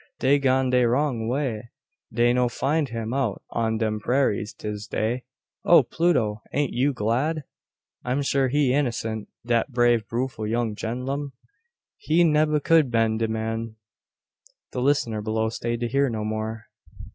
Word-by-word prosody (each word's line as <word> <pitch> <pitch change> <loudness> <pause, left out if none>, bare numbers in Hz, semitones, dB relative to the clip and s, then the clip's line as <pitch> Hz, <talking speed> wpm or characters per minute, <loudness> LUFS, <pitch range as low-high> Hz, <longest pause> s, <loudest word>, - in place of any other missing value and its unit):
Dey 140 +2 +3
gone 130 -1 +2
dey 125 -1 +4
wrong 120 -2 0
way. 120 -3 -2 0.4
Dey 120 +1 +3
no 125 -1 +2
find 145 +4 0
him 115 0 -4
out 135 0 -1
on 115 -1 0
dem 110 -1 -1
prairas 115 -3 0
dis 105 0 -6
day." 120 +4 -2 0.4
"O, 170 -4 +6
Pluto! 120 -7 0
an't 145 -1 0
you 135 +4 +2
glad? 130 +7 -1 0.6
I'm 130 +3 -1
sure 135 -1 +2
he 135 -1 +2
innocent 115 -6 -1 0.2
dat 120 +3 +1
brave 120 -2 +2
bewful 115 -3 -2
young 115 -1 0
gen'lum. 130 +6 -4 0.6
He 165 +3 +2
nebba 150 -2 +3
could 160 -5 +4
been 115 -2 +1
de 115 - +1
man 110 0 -3 0.5
" - - -34
The 125 - -3
listener 125 -6 +1
below 110 +1 -1
stayed 115 +1 -3
to 120 - 0
hear 140 +3 +1
no 110 -2 -3
more. 110 +1 -4
120 Hz, 155 wpm, -24 LUFS, 110-140 Hz, 0.6 s, O